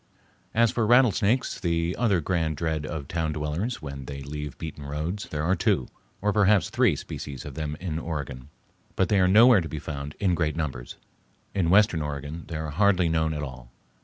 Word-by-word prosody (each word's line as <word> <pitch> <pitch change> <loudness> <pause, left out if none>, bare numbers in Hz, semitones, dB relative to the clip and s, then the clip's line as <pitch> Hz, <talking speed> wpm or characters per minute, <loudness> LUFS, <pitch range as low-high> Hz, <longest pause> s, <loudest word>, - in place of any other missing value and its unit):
As 115 0 +4
for 115 -3 0
rattlesnakes, 120 0 +3
the 85 -1 0
other 105 -8 +2
grand 80 -2 -1
dread 80 -2 -2
of 75 -4 -5
town 80 -2 -1
dwellers 80 +9 -3
when 70 -2 -6
they 70 0 -7
leave 75 0 -6
beaten 80 -2 -7
roads, 75 +8 -4
there 75 0 -3
are 90 +4 +2
two, 65 -7 +1 0.3
or 105 0 +2
perhaps 105 -1 +3
three, 120 -9 +3
species 70 -1 -7
of 75 - -7
them 75 +1 -4
in 85 -4 -3
Oregon. 70 -5 -5 0.5
But 95 - +1
they 100 - +3
are 90 - +4
nowhere 110 +2 +7
to 80 - -6
be 80 - -5
found 70 -1 -6
in 95 -3 +2
great 80 -3 0
numbers. 70 -7 -4 0.6
In 90 -4 +1
western 95 -3 +4
Oregon 75 +2 -5
they 80 - -4
are 80 -1 -4
hardly 95 0 +3
known 80 -1 +1
at 75 - -3
all. 65 -3 -9
80 Hz, 190 wpm, -26 LUFS, 75-95 Hz, 0.6 s, nowhere